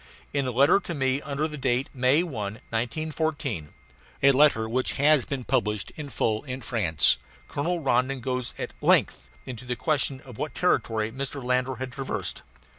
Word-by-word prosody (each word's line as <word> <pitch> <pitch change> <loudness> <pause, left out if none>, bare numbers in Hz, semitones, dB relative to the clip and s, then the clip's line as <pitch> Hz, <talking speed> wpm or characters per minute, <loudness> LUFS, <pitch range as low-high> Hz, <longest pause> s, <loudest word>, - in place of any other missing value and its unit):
In 140 -2 0
a - - 0
letter 140 +9 +5
to 175 -3 -5
me 135 0 +1
under 145 +2 -1
date 135 -3 0
of - - -27
May 130 +5 +3
1, 170 -5 -6
1914 115 - -3 0.5
a 140 - +8
letter 135 -5 +4
which 125 +3 0
has 145 -1 +4
been 135 -3 -3
published 105 -5 0
in 150 -2 -6
full 110 -5 0
in 130 -1 -5
France 100 - +2 0.3
Colonel 170 +4 -1
Rondon 135 -1 +1
goes 125 -1 -3
at - - -4
length - - +3 0.2
into 125 -2 -7
the 125 0 -3
question 135 +2 0
of 125 -7 -12
what - - -3
territory 110 -1 +1
Mr. 135 +2 -5
Landor 125 +1 +1
had 130 +1 -5
traversed. 135 +1 -4
130 Hz, 170 wpm, -26 LUFS, 120-145 Hz, 0.5 s, a